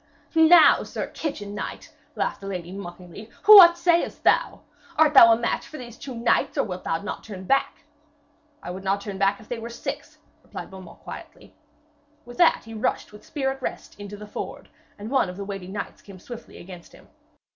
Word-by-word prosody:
'Now, 325 0 +7
sir - - -5
kitchen 210 -10 -5
knight,' - - -7 0.2
laughed - - -2
the 195 - -8
lady 180 -3 -5
mockingly, 185 +2 -10 0.2
'what 370 -5 +10
sayest 340 0 +1
thou? - - +2 0.4
Art 310 -1 +4
thou 230 -5 +9
a 225 - +4
match 235 - -2
for 310 - -10
these 240 -3 -10
two 260 +1 -9
knights, 230 +1 0
or - - +3
wilt 185 -2 -6
thou 165 - -1
not - - -6
turn 195 -4 -9
back?' 275 +8 0 0.8
'I - - -6
would 190 +2 -8
not 195 +1 0
turn 200 -1 -7
if 200 +2 0
they 245 - -5
were 230 +1 -7
six,' 235 - -7 0.2
replied - - -9
Beaumains 190 -1 -12
quietly. - - -11 0.7
With 245 0 -12
that 345 -2 +4
he 225 - -11
rushed, 215 -1 -2
with 210 - -14
spear 270 -3 -2
at 270 0 -9
rest, - - -6
into 205 0 -8
the 210 - -10
ford, 210 - -8 0.3
and 210 +3 -8
one 265 -8 +2
of 180 - -9
the 200 - -6
waiting 195 -2 -7
knights 200 0 -6
came 195 -2 -13
swiftly 240 +5 -11
against 175 -1 -12
him. - - -18
210 Hz, 195 wpm, -24 LUFS, 195-265 Hz, 0.8 s, what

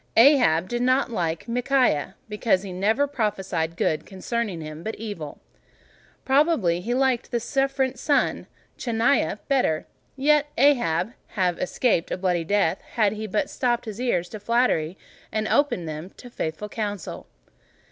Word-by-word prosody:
Ahab 230 - +6
did 240 +3 -2
not 255 +1 +2
like 170 -5 -2
Micaiah, 245 - +1
because 210 -2 +1
he 190 -2 -6
never 215 +9 +2
prophesied 195 - -2
good 155 - 0
concerning 205 -1 -3
him, 155 0 -7
but 220 +5 -4
evil; 200 -9 -7 0.9
probably 265 - +3
he 240 +6 -1
liked 260 -2 +1
the 235 - 0
sycophant 270 +1 0
son 290 +2 +2
of - - -15 0.3
Chenaanah 230 - +1
better; 255 - +1 0.3
yet 295 +2 +3
might 255 - +3
Ahab 185 - 0 0.2
have 180 -3 +1
escaped 180 -3 +1
a - - -2
bloody 180 -2 0
death, 195 0 +1
had 215 -4 +2
he 215 0 -5
but 210 +1 0
stopped 240 -2 -1
his 215 +1 -6
ears 180 -9 0
to 215 - -7
flattery, 205 -7 +1 0.3
and 215 0 -1
opened 250 - +1
them 155 +3 -6
to 245 - -12
faithful 160 +1 -4
counsel. 205 -4 -5
215 Hz, 150 wpm, -24 LUFS, 180-250 Hz, 0.9 s, Ahab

